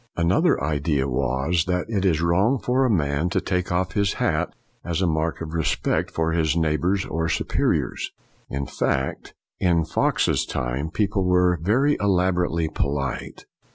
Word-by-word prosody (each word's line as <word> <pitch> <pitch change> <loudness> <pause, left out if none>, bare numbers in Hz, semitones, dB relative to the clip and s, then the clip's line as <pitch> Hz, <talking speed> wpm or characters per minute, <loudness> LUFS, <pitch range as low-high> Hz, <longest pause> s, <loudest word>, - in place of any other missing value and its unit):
Another 85 +3 +3
idea 70 -2 0
was 65 +6 0
that 90 0 -1
it 100 -4 -1
is 80 -3 +2
wrong 95 +10 +3
for 130 +2 +1
a - - +2
man 80 -4 +1
to - - +1
take 90 -1 -2
off 90 0 0
his 100 +1 +1
hat - - 0 0.3
as 85 -1 -2
a 95 - +2
mark 80 0 -1
of 80 -1 -5
re 80 -1 0
spect - - 0
for 80 0 -1
his 80 -1 +1
neighbors 85 +5 +1
or 80 +1 -2
superiors. - - 0 0.4
In 70 0 -3 1.2
Fox's 80 - +1
time 65 +5 -2
people 100 +2 0
were 90 -1 +3
very 130 - +2
elaborately 90 -4 +1
polite. 70 -3 -3
85 Hz, 150 wpm, -23 LUFS, 80-95 Hz, 1.2 s, Another